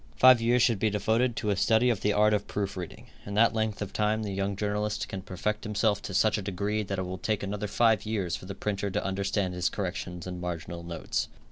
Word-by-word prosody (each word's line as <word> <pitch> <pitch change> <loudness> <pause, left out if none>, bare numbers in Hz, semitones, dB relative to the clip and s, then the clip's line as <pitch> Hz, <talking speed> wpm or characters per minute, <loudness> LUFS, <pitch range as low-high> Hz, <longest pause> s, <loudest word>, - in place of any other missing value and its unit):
Five 130 -2 +7
years 120 +1 +3
should 115 -5 +3
be 110 - +2
devoted 110 +4 +1
to 105 -2 -1
a - - +2
study 115 +5 +3
of 110 - -2
the 105 - +2
art 105 +1 +4
of 105 -1 0
proof 100 -1 -3
reading. 90 -3 -7 0.2
In 100 - -6
that 115 +2 +5
length 110 -2 -1
of 100 - -8
time 110 +1 +1
the 100 -2 -3
young 100 +1 -1
journalist 105 +1 -1
can 95 - -5
perfect 100 +2 -3
himself 105 -1 +1
to 100 - -5
such 110 +1 +3
a - - -4
degree 100 +2 -1
that 100 -1 -3
it 95 - -2
will 90 0 -5
take 105 0 -1
another 105 +1 -3
five 110 0 +3
years 100 -5 -1
for 95 - -9
the 100 - -6
printer 100 0 -2
to 105 +2 -2
understand 100 -1 -1
his 90 0 0
corrections 90 -3 -4
and 90 -1 -6
marginal 85 0 -5
notes. 85 -1 -3
105 Hz, 240 wpm, -28 LUFS, 95-110 Hz, 0.2 s, Five